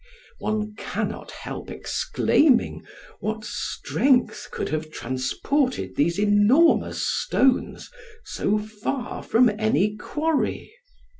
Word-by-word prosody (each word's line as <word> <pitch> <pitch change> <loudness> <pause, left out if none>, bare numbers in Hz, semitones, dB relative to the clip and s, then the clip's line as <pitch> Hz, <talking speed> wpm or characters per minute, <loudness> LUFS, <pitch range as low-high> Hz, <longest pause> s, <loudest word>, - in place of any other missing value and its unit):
One 215 0 -2
cannot - - -4
help - - -7
exclaiming, 280 -6 +1 0.4
what 215 0 -3
strength 255 +4 0
could - - -4
have 155 0 -3
transported 155 - -1
these 170 +4 +1
enormous 210 +11 +4
stones 265 - +1 0.3
so 210 +2 -1
far 215 +4 -4
from 245 +2 +4
any 210 -1 +2
quarry? 305 +7 -2
215 Hz, 90 wpm, -24 LUFS, 205-260 Hz, 0.4 s, enormous